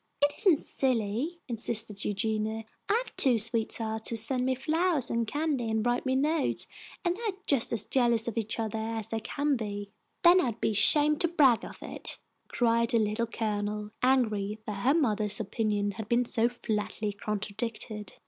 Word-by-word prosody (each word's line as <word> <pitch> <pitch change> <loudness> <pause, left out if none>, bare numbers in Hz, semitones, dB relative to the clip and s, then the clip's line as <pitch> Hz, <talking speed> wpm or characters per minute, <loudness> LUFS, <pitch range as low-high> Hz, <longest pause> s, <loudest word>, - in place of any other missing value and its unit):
"It 290 0 +3
isn't 370 -8 +4
silly!" 255 +6 -1
insisted 225 -3 -1
Eugenia. 220 +2 -1 0.3
"I 460 +4 +3
have - - -14
two 255 -4 +5
sweethearts 220 0 +1
who 230 - -2
send 250 +3 +1
me 260 - +1
flowers 310 +1 0
and 230 -1 0
candy, 290 -4 -1
and 220 0 -1
write 245 +2 0
me 260 - +1
notes, 300 +3 0 0.4
and 350 0 +1
they 430 - -10
are 425 -5 -2
just 275 -5 +2
as 220 -3 -1
jealous 235 -3 +2
of 230 - -3
each 225 -1 -1
other 220 -1 -3
as 225 -1 -4
they 225 - -2
can 285 +6 -1
be." 205 -3 -5 0.3
"Then 355 +1 +7
I'd 235 -6 -2
be - - +1
ashamed 295 +8 +6
to 340 - +3
brag 285 -8 +4
of - - -10
it," - - -2 0.3
cried 230 -1 +1
the 235 - +2
Little 215 +1 0
Colonel, 210 -2 -3
angry 220 -6 +1
that 205 -2 -5
her 265 +8 +2
mother's 215 -9 0
opinion 205 -1 -1
had 210 +2 -8
been 240 +1 +2
so 235 0 +1
flatly 215 -3 -3
contradicted. 210 +1 -5
230 Hz, 175 wpm, -29 LUFS, 215-265 Hz, 0.4 s, Then